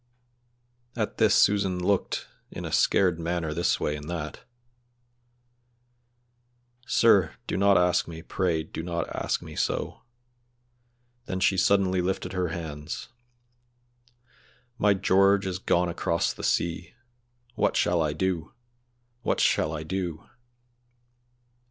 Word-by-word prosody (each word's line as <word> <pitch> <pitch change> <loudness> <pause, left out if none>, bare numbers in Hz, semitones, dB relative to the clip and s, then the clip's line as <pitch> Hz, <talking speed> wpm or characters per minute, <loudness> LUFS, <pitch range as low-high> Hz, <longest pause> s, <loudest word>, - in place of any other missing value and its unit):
At 110 -3 -3
this 110 -3 +5
Susan 100 -3 +3
looked 90 +2 -1 0.2
in - - -7
a - - -5
scared 90 -4 +3
manner 85 -2 -2
this 85 +2 +1
way 75 - -1
and 75 +1 -8
that. 80 -3 -5 2.5
"Sir, 100 -8 +4
do - - -3
not 100 0 +4
ask 90 0 +2
me, 80 -1 -8
pray 85 -4 -1
do 80 - -7
not 85 0 -3
ask - - -2
me - - -10
so;" - - -2 1.3
then 95 - -3
she 95 +1 +3
suddenly 95 -1 +3
lifted 95 +2 -2
her 90 -1 0
hands, 80 -2 -6 1.7
"My 105 -1 +4
George 100 +1 +3
is 90 -1 -3
gone 90 -2 +1
across 85 0 -1
the - - -10
sea! 85 +6 -1 0.6
What - - +1
shall 85 -1 +2
I 75 -2 +1
do! 90 -2 -2 0.7
what - - 0
shall - - +2
I 80 -1 -4
do!!" 85 -1 -4
90 Hz, 120 wpm, -26 LUFS, 80-95 Hz, 2.5 s, this